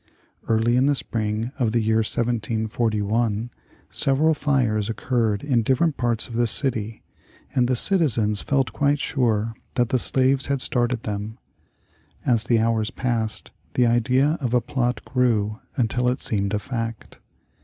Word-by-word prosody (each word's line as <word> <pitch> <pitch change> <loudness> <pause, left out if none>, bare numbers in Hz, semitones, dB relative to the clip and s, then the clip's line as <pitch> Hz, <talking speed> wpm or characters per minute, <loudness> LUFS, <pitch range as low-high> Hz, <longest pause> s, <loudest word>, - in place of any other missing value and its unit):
Early 115 +2 +2
in 130 +2 +3
the 145 - +3
spring 110 -1 -2
of 115 -4 +1
the 120 - +3
year 110 0 +1
1741 110 0 -1 0.4
several 145 +4 +2
fires 125 -8 0
occurred 115 -3 -1
in 130 -5 +2
different 135 +7 +1
parts 120 -2 0
of 120 - -10
the 120 +1 +1
city, 110 -3 -1 0.5
and 125 -1 +2
the 130 - +1
citizens 115 - +3
felt 135 -2 0
quite 145 0 +2
sure 115 -6 0 0.2
that 120 -2 +1
the 130 -2 +1
slaves 130 +2 +2
had 140 0 0
started 120 -2 +2
them. 105 +2 -5 0.9
As 115 -2 +2
the 120 -2 +2
hours 110 -1 +1
passed, 115 -4 -2 0.2
the 125 - +4
idea 125 +6 +2
of 125 -2 0
a - - +5
plot 125 -1 -2
grew 110 -5 0 0.2
until 125 0 +1
it 125 +2 -2
seemed 100 -1 -1
a - - +1
fact. 115 0 -6
120 Hz, 150 wpm, -23 LUFS, 110-130 Hz, 0.9 s, a